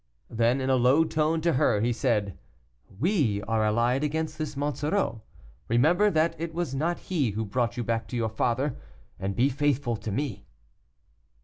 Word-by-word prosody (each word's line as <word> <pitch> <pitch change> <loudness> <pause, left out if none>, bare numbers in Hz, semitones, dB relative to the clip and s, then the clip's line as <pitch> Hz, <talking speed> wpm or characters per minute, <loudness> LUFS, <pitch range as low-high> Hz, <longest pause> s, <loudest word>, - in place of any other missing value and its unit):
Then, 120 +3 +2
in 135 0 0
a 130 - +4
low 130 +6 +4
tone 160 0 0
to 170 0 +2
her, 115 -4 +2
he 120 +3 +1
said, 105 - 0 0.6
"We 140 - +1
are 110 +1 0
allied 120 +5 +1
against 155 +1 -2
this 150 -2 -4
Monsoreau; 145 - -1 0.5
remember 160 - +4
that 160 -2 +1
it 165 0 -4
was 170 -6 -2
not 165 +6 0
he 155 -10 -1
who 110 +2 -3
brought 120 +3 -1
you 120 - -1
back 115 0 -2
to - - -6
your 115 -1 0
father, 120 +5 0 0.4
and 95 0 -3
be 125 +3 +3
faithful 140 -3 0
to 105 +1 -5
me." 130 -1 -3
130 Hz, 175 wpm, -27 LUFS, 115-155 Hz, 0.6 s, a